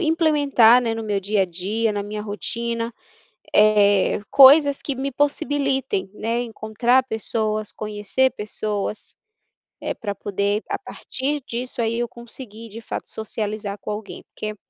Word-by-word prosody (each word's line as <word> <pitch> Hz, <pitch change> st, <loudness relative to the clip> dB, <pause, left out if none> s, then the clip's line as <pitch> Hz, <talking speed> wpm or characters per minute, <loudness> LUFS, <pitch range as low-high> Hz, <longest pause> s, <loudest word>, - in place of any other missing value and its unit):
implementar, 295 Hz, -8 st, +4 dB
né, 230 Hz, -2 st, -1 dB
no 225 Hz, 0 st, -4 dB
meu 205 Hz, -2 st, -1 dB
dia 200 Hz, +1 st, +1 dB
a -, -, +2 dB
dia, 200 Hz, +6 st, -1 dB
na 205 Hz, -1 st, -2 dB
minha 210 Hz, +1 st, -5 dB
rotina, 230 Hz, +3 st, -2 dB, 0.6 s
eh, 205 Hz, -2 st, +4 dB
coisas 280 Hz, +1 st, +7 dB
que 280 Hz, -, -3 dB
me 270 Hz, +2 st, -3 dB
possibilitem, 275 Hz, -6 st, 0 dB
né, 230 Hz, +3 st, -2 dB
encontrar 235 Hz, +2 st, +1 dB
pessoas, 215 Hz, -2 st, -1 dB
conhecer 215 Hz, +5 st, 0 dB
pessoas, 210 Hz, 0 st, -3 dB, 0.7 s
eh, -, -, -2 dB
para 205 Hz, -2 st, -5 dB
poder, 200 Hz, +2 st, -1 dB
a -, -, -1 dB
partir 285 Hz, +3 st, -4 dB
disso, 245 Hz, +1 st, -4 dB
aí 230 Hz, +1 st, 0 dB
eu 240 Hz, -, 0 dB
conseguir 230 Hz, -1 st, -10 dB
de 220 Hz, +2 st, -9 dB
fato 230 Hz, -, -6 dB
socializar 210 Hz, -1 st, -4 dB
com -, -, -5 dB
alguém, 210 Hz, 0 st, -7 dB
porque 215 Hz, 0 st, -5 dB
225 Hz, 145 wpm, -22 LUFS, 210-255 Hz, 0.7 s, coisas